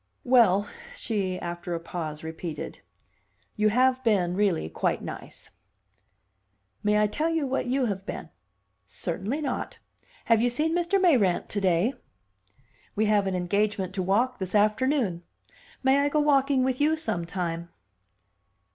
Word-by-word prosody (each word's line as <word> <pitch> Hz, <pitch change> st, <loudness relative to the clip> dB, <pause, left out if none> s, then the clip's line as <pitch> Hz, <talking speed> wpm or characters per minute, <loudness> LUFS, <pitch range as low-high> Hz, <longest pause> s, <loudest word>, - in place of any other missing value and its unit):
"Well," 220 Hz, -6 st, +4 dB, 0.3 s
she, 200 Hz, -, -2 dB
after 175 Hz, 0 st, -4 dB
a -, -, -3 dB
pause, 160 Hz, -2 st, -6 dB
repeated, 160 Hz, 0 st, -6 dB, 0.8 s
"you 215 Hz, -1 st, +3 dB
have 255 Hz, +3 st, +2 dB
been 195 Hz, -7 st, +2 dB
really 190 Hz, -, +1 dB
quite 80 Hz, -, -1 dB
nice." -, -, -9 dB, 1.3 s
"May 210 Hz, 0 st, +2 dB
I 210 Hz, -, +4 dB
tell 300 Hz, +10 st, -1 dB
you 325 Hz, -3 st, 0 dB
what 265 Hz, -1 st, -1 dB
you 260 Hz, +1 st, +1 dB
have 195 Hz, -4 st, -3 dB
been?" -, -, -7 dB, 0.6 s
"Certainly 230 Hz, +11 st, -3 dB
not. 275 Hz, -4 st, -3 dB, 0.5 s
Have 230 Hz, -1 st, +4 dB
you 245 Hz, -, +3 dB
seen 310 Hz, +7 st, 0 dB
Mr. 350 Hz, +3 st, +1 dB
Mayrant 250 Hz, -, +3 dB
to 205 Hz, -, -2 dB
day?" 185 Hz, +6 st, +2 dB, 1.0 s
"We 215 Hz, -, +2 dB
have 210 Hz, -2 st, +2 dB
an 190 Hz, -, -1 dB
engagement 195 Hz, +1 st, 0 dB
to 190 Hz, -, -2 dB
walk 230 Hz, +8 st, +1 dB
this 190 Hz, +1 st, -3 dB
afternoon. 215 Hz, -, +2 dB, 0.6 s
May 265 Hz, +1 st, +4 dB
I 285 Hz, 0 st, +2 dB
go 300 Hz, -, +1 dB
walking 275 Hz, -2 st, +3 dB
with 260 Hz, +1 st, 0 dB
you 310 Hz, +2 st, +3 dB
sometime?" 170 Hz, -, -3 dB
210 Hz, 140 wpm, -26 LUFS, 185-260 Hz, 1.3 s, Well